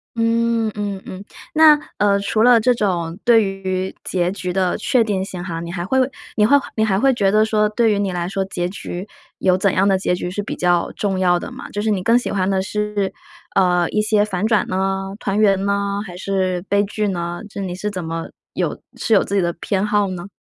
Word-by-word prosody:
嗯， 230 0 +1
嗯 205 -2 -3
嗯， 190 +2 -8 0.3
那， 310 -1 +8 0.2
呃， 200 -1 +3
除 215 +2 +1
了 245 -1 +7
这 250 +3 +3
种 175 -5 -1
对 230 -2 +6
于 190 -1 -3
结 180 -1 0
局 180 -2 -4
的 185 -2 +1
确 245 +1 +2
定 195 -3 -1
性 180 -2 -7
哈， 165 -2 -4
你 170 0 -6
还 175 -1 -3
会 260 +9 0 0.4
你 210 - +4
会 285 +6 +5 0.2
你 220 -1 +2
还 195 -2 +1
会 270 +2 +4
觉 195 -4 +2
得 215 +1 +4
说 215 -1 +2
对 225 +1 +2
于 205 - +1
你 200 -2 -1
来 175 0 -3
说， 195 0 -1
结 180 -2 -3
局 185 0 -6 0.3
有 185 -1 +3
怎 190 0 +1
样 195 +2 +3
的 190 -1 +3
结 185 - 0
局 180 0 -3
是 205 +3 -3
比 - - -5
较 175 -1 +1
重 195 -2 -1
要 175 -1 +3
的 - - -7
吗？ - - -8
就 205 - -3
是 220 - 0
你 195 -4 0
更 230 +4 +4
喜 - - -4
欢 190 -2 0
的 190 -1 +1
是， 210 -1 -2 0.4
呃， 180 -3 +3
一 210 - 0
些 210 -1 +3
反 195 -1 -2
转 220 -2 +2
呢？ 195 +1 -2
团 200 +1 -1
圆 195 -2 +3
呢？ 200 0 0
还 180 - -9
是 185 -1 -1
悲 200 0 +3
剧 210 +1 -2
呢？ 175 -1 -3
就 200 - -8
你 180 -2 -4
是 210 +3 -3
怎 185 -5 -5
么 165 0 -4 0.2
有 - - -2 0.2
是 225 - +1
有 - - +4
自 - - -6
己 200 - +3
的 170 - 0
偏 190 +3 -2
好 205 -1 +2
呢？ 180 +1 -6
195 Hz, 250 characters per minute, -20 LUFS, 185-210 Hz, 0.4 s, 那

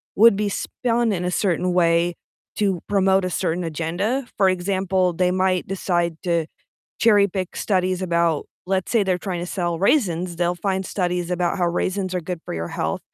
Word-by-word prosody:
would 225 0 +7
be 205 0 0
spun 235 +2 -1
in 180 -2 -2
a 180 - -1
certain 180 -1 0
way 170 0 +2 0.4
to 195 -4 0
promote 195 -1 +3
a 185 - -1
certain 175 0 -1
agenda, 175 - -2
for 195 -2 +4
example, 185 0 0
they 180 +1 +1
might 185 -1 +1
decide 175 -3 -1
to 170 -3 0 0.5
cherry 205 -3 +5
pick 185 -1 -4
studies 185 -2 0
about 170 -3 +1 0.2
let's 190 -1 -1
say 230 -3 +4
they're 185 -2 0
tryna 175 -2 -4
sell 175 -3 -1
raisins, 180 - +1
they'll 175 +1 +1
find 190 +1 -2
studies 180 -2 -1
about 175 +1 0
how 175 - +2
raisins 185 +2 -1
are 180 - 0
good 175 0 -5
for - - -5
your 85 0 -3
health, - - -2
180 Hz, 180 wpm, -22 LUFS, 175-195 Hz, 0.5 s, would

